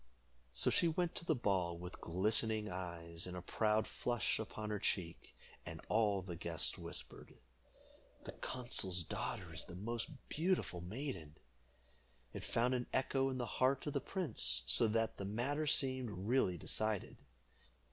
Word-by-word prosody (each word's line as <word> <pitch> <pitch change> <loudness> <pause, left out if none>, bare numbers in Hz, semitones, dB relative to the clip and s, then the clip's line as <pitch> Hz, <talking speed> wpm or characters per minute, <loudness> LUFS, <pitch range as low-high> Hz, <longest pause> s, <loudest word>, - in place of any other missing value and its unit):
So - - +3
she 170 - +4
went 170 +1 +1
to - - -5
the 160 - +3
ball 95 -7 +1
with 90 +1 -8
glistening 105 +4 +2
eyes 85 -1 -4
and 90 0 -5
a - - -4
proud 110 +2 +2
flush 120 -3 0
upon 110 -1 -4
her 105 - -1
cheek, 85 -3 -2 0.3
and - - -7
all 105 -3 +3
the 90 -2 -5
guests - - +1
whispered, - - -6 0.9
"The - - -6
consul's 95 -8 -1
daughter 95 -2 -4
is 80 - -4
the - - -9
most 115 - -3 0.2
beautiful 165 - 0
maiden." 90 - -5 1.0
It - - -5
found 120 +2 +2
an 125 -1 0
echo 135 0 +2
in 130 - -2
the 125 - -1
heart 130 +3 +2
of 145 - -2
the 140 - +1
prince, 65 - +1
so 65 - +5
that 115 +1 +1
the 100 - -3
matter 135 +9 0
seemed 130 -4 +2
really 100 -1 +1
decided. 110 +4 -1
110 Hz, 155 wpm, -38 LUFS, 90-130 Hz, 1.0 s, so